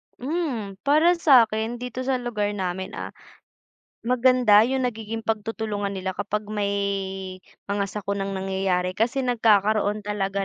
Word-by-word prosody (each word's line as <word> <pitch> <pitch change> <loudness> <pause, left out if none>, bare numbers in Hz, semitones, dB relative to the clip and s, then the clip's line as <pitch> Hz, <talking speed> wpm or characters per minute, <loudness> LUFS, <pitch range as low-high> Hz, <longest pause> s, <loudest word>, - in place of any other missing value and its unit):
Hmm, 255 - -3
para 305 +5 +5
sakin, 230 -7 +4
dito 250 0 -5
sa 265 0 +1
lugar 240 -4 -2
namin, 190 0 -3
ah, - - -6 0.9
maganda 250 -3 +5
'yung 265 0 0
nagiging 225 -2 -4
pagtutulungan 220 -2 -2
nila 190 -1 -3
kapag 205 +2 -3
may 200 -1 -1 0.9
mga 200 0 -1
sakunang 195 -1 -3
nangyayari. 190 -1 -1
Kasi 235 +7 0
nagkakaroon 215 -3 +2
talaga 200 -1 -2
215 Hz, 120 wpm, -24 LUFS, 200-245 Hz, 0.9 s, para